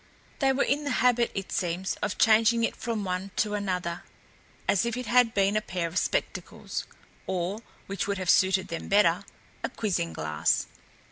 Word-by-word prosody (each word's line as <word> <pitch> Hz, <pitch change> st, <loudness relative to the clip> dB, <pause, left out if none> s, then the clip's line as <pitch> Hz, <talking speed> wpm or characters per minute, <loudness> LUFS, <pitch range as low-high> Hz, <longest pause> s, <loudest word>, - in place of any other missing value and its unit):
They 270 Hz, -2 st, +3 dB
were 265 Hz, -, +2 dB
in 290 Hz, +2 st, 0 dB
the 290 Hz, -, -2 dB, 0.2 s
habit, 240 Hz, -1 st, +4 dB
it 195 Hz, -2 st, -4 dB
seems, 180 Hz, +2 st, -1 dB
of 190 Hz, -, -2 dB
changing 225 Hz, +1 st, +4 dB
it -, -, 0 dB
from 230 Hz, -3 st, -3 dB
one 185 Hz, +1 st, -3 dB
to 210 Hz, -1 st, 0 dB
another, 180 Hz, -4 st, -2 dB, 0.7 s
as 195 Hz, -, +3 dB
if 235 Hz, 0 st, -2 dB
it 250 Hz, -, -4 dB
had 240 Hz, 0 st, +3 dB
been 200 Hz, +1 st, +2 dB
a 215 Hz, -, +2 dB
pair 180 Hz, -4 st, -3 dB
of 165 Hz, +3 st, 0 dB
spectacles, -, -, -3 dB, 0.4 s
or 185 Hz, +3 st, -2 dB, 0.3 s
which 200 Hz, 0 st, -3 dB
would 200 Hz, 0 st, -1 dB
have 185 Hz, -2 st, +2 dB
suited 190 Hz, -1 st, +3 dB
them 165 Hz, -, -5 dB
better 195 Hz, -2 st, +3 dB, 0.4 s
a -, -, -1 dB
quizzing 180 Hz, -6 st, -1 dB
glass. 75 Hz, -1 st, 0 dB
200 Hz, 180 wpm, -27 LUFS, 180-225 Hz, 0.7 s, habit